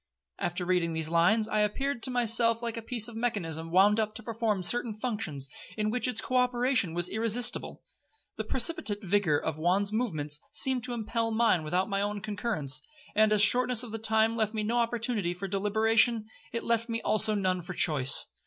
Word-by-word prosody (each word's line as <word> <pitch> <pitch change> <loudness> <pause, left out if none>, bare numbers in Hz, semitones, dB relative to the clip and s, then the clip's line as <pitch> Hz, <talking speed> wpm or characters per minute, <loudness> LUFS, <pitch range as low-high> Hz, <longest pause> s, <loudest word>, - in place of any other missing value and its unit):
'After 175 +1 -3
reading 175 -2 0
these 160 -1 -1
lines, 185 +7 +3
I 215 - 0
appeared 240 +5 -1
to 260 - +3
myself 230 -1 +2
like 235 -1 -3
a 230 - -5
piece 225 -1 0
of 235 - -10
mechanism 170 -9 -2
wound 200 +5 +4
up 215 0 -2
to 240 - -6
perform 220 -4 -2
certain 235 +3 +1
functions, 210 - -3 0.3
in 215 0 0
which 250 +2 -1
its 250 - 0
co 255 - -1
operation 250 -7 +1
was 175 0 0
irresistible. 225 +3 0 0.5
The - - -4
precipitate 225 -6 0
vigour 190 -5 +2
of 155 +1 -3
Juan's 190 +5 +2
movements 155 -11 -1
seemed 260 -2 +1
to 250 - -5
impel 230 0 -2
mine 225 -6 +2
without 180 +5 0
my 195 -1 -1
own 205 0 -2
concurrence; 200 - -2 0.3
and 215 0 +3
as 210 -1 +3
the - - +8
shortness 250 +1 +1
of 235 - -8
the 225 - -5
time 220 +1 +2
left 220 -1 -1
me 215 - -1
no 235 +3 0
opportunity 230 -6 -1
for 195 +2 -5
deliberation, 220 +3 +2 0.3
it 230 - -4
left 230 0 0
me 230 0 -1
also 215 0 +2
none 185 -2 0
for 180 +2 -7
choice. 140 -5 +3
215 Hz, 195 wpm, -28 LUFS, 185-230 Hz, 0.5 s, the